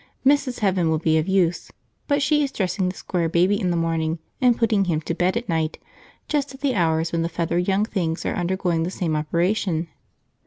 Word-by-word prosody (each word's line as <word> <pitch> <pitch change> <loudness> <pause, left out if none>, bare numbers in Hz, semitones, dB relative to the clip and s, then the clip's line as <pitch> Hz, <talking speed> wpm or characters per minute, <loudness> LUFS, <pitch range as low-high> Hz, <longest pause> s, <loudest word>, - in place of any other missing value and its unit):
Mrs. 270 -3 +2
Heaven 185 -5 +2
would 160 0 0
be 160 0 +3
of 155 - -2
use, 185 -3 +1 0.4
but 285 -1 +2
she 295 +1 +3
is 275 - -2
dressing 185 -3 -1
the 185 - -6
Square 170 -3 -2
Baby 180 +5 +2
in 180 - 0
the 175 - 0
morning 165 -1 0 0.2
and 245 -2 +4
putting 215 -4 +2
him 165 -4 0
to 165 - -3
bed 180 +5 +1
at 240 - -4
night 160 -2 -1 0.5
just 285 -2 -1
at 265 - -16
the 280 -2 +1
hours 165 -4 +1
when 170 - 0
the 165 - -1
feathered 170 +1 -1
young 195 +2 +2
things 170 -7 -2
are - - 0
undergoing 175 -1 0
the 165 - -1
same 170 -4 -2
operation. 170 +2 0
180 Hz, 210 wpm, -23 LUFS, 165-210 Hz, 0.5 s, and